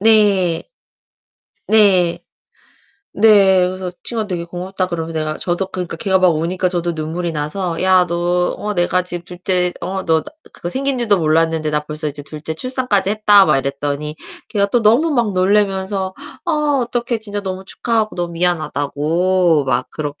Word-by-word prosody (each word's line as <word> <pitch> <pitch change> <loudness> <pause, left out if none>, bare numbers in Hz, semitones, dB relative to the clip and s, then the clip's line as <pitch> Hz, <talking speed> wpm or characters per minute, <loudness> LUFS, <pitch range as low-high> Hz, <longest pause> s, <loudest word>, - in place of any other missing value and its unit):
네. 200 -6 +3 1.1
네. 185 -6 +4 0.9
네. 195 -4 +5
그래서 185 0 -4
친구가 225 -3 -2
되게 175 -4 -3
고맙다 185 +2 -3
그러면 165 -2 -4
내가 155 -1 -2
저도 180 +2 -2
그러니까 180 -2 -5
걔가 190 -4 +1
막 185 -1 +4
우니까 170 +3 0
저도 175 -1 -2
눈물이 165 +2 -3
나서 165 +3 -3
"야, 185 -1 +4
너 175 +1 0
어 210 0 -4
내가 180 +1 +1
지금 175 -1 -4
둘째 180 0 0
어 190 0 -4
너 160 -1 +2
나 - - -24 0.3
그거 175 - -6
생긴 270 +5 0
줄도 210 -5 +2
몰랐는데 160 -1 +1
나 150 0 +1
벌써 150 0 -3
이제 145 0 -7
둘째 155 +2 -6
출산까지 250 -2 0
했다." 210 -2 +5
막 150 -3 +3
이랬더니 145 +2 -3 0.3
걔가 200 -1 +1
또 235 +3 +1
너무 245 +10 +4
막 235 -5 +1
놀라면서 190 0 +1 0.3
"아 345 - -1 0.4
어떡해. 240 -1 -2
진짜 205 -1 -4
너무 190 -1 -5
축하하고 220 +1 -1
너무 175 -1 -3
미안하다."고 165 0 +1
막 130 - 0
그렇게. 145 -2 -5
180 Hz, 330 characters per minute, -18 LUFS, 165-200 Hz, 1.1 s, 네